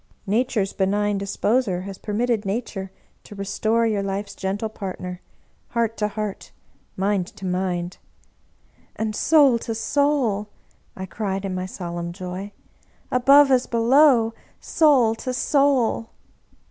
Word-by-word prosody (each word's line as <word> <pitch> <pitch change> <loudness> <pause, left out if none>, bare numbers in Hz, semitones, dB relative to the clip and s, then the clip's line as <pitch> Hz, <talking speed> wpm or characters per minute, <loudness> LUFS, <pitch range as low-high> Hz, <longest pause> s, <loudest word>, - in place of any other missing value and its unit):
Nature's 215 -1 0
benign 205 +1 0
Disposer 200 0 0
has 195 0 -8
permitted 225 +1 -1
Nature 195 -2 -4 0.3
to 205 - -12
restore 215 +3 0
your 215 -3 0
life's 200 +1 -4
gentle 200 +3 -3
partner, 185 -4 -6 0.5
heart 230 -1 -1
to 210 - 0
heart, 210 -1 -5 0.5
mind 195 -1 0
to 195 -1 -10
mind 180 -1 -2 0.3
" - - -40
" - - -35
And 220 -1 -2
soul 280 -5 +4
to 225 0 -4
soul," 235 -4 0 0.5
I 190 - -5
cried 195 0 -3
in 190 - -3
my 185 0 -3
solemn 170 -2 -5
joy. 185 +2 -6 0.3
" - - -36
Above 275 +3 +6
as 255 -1 +3
below, 235 0 +4 0.3
soul 270 -8 +3
to 255 -1 -3
soul 265 -4 +2
210 Hz, 135 wpm, -23 LUFS, 195-235 Hz, 0.5 s, Above